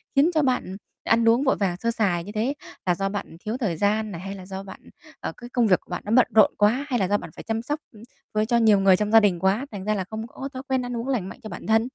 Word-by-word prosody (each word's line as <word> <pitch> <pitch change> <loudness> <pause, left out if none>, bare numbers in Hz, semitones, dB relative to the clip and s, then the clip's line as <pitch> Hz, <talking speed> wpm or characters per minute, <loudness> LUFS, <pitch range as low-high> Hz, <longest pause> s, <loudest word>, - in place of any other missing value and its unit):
khiến 290 +5 +5
cho 310 - +3
bạn, 260 -3 +1
ừ, 190 +1 -7 0.3
ăn 230 0 +3
uống 240 +5 +3
vội 265 - +3
vàng, 190 -4 0
sơ 230 +4 -1
sài 185 -7 0
như 205 - -8
thế? 225 +6 -1 0.3
Là 180 -1 +2
do 195 +2 -1
bạn, 205 0 -3
ừ, 165 - -13
thiếu 220 +4 -2
thời 195 - -1
gian 210 +2 +1
này, 170 -1 -7
hay 195 +1 -6
là 185 -1 -10
do 190 0 -6
bạn, 195 - -10
ừ, - - -17 0.3
ờ, - - -4
cái 240 0 -10
công 240 -3 +2
việc 185 - +4
của - - -30
bạn - - -4
nó 210 - -4
bận 255 +1 +5
rộn 215 - +7
quá 230 +7 +2
hay 245 -3 +1
là 190 - +1
do 205 +1 +2
bạn - - -8
phải - - -9
chăm 225 0 -2
sóc, 295 +5 -3
ưm, 220 -1 -15 0.3
với 215 0 +2
cho 235 +1 +2
nhiều 215 -3 +5
người 195 -1 +6
trong 210 +2 -1
gia 225 - +9
đình 195 -5 +2
quá, 195 +8 +1
thành 195 -2 -6
ra 215 +1 0
là 190 - -1
không 220 +4 -6
có 270 +4 -7
thói 260 +1 -6
quen 260 -1 +1
ăn 245 -1 -4
uống 235 +3 -4
lành 220 -9 -1
mạnh - - -11
cho 215 - -7
bản - - -8
thân? 225 +2 +3
215 Hz, 325 wpm, -24 LUFS, 195-240 Hz, 0.3 s, gia